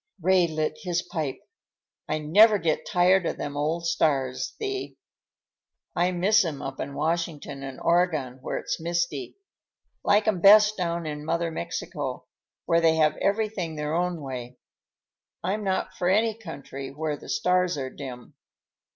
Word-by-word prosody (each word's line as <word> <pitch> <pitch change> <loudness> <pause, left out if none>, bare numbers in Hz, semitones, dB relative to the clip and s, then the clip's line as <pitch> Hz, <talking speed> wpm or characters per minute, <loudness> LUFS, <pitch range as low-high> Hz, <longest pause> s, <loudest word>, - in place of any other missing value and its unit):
Ray 180 0 +4
lit 155 -1 -2
his 175 -2 -1
pipe. 155 -7 -4 0.7
"I 155 - +1
never 205 +9 +6
get 165 -4 -1
tired 180 -1 +3
of - - -3
them 145 0 -5
old 160 +4 -1
stars, 135 -6 0
Thee. 400 -3 -4 1.0
I 180 +1 +2
miss 200 +4 +4
'em 155 -5 -4
up 135 0 -6
in 140 +1 -5
Washington 155 -3 -2
and 135 -1 -7
Oregon 160 -7 +1
where - - -3
it's - - -3
misty. 170 - -2 0.7
Like 205 +1 +3
'em 195 -5 +1
best 210 +2 +8
down 170 -3 -2
in 150 -1 -5
Mother 165 +1 -1
Mexico, 120 - -4 0.4
where 165 0 +3
they 165 -1 +4
have 155 -1 +3
everything 200 -5 -1
their 150 0 -3
own 175 0 0
way. 125 -2 -6 0.9
I'm 200 +4 -1
not 190 -1 -1
for 180 - -1
any 220 +3 +3
country 140 -9 -8
where 150 +1 -3
the - - -12
stars 180 -5 +1
are 130 -1 -4
dim." 125 -4 -9
170 Hz, 150 wpm, -26 LUFS, 150-185 Hz, 1.0 s, best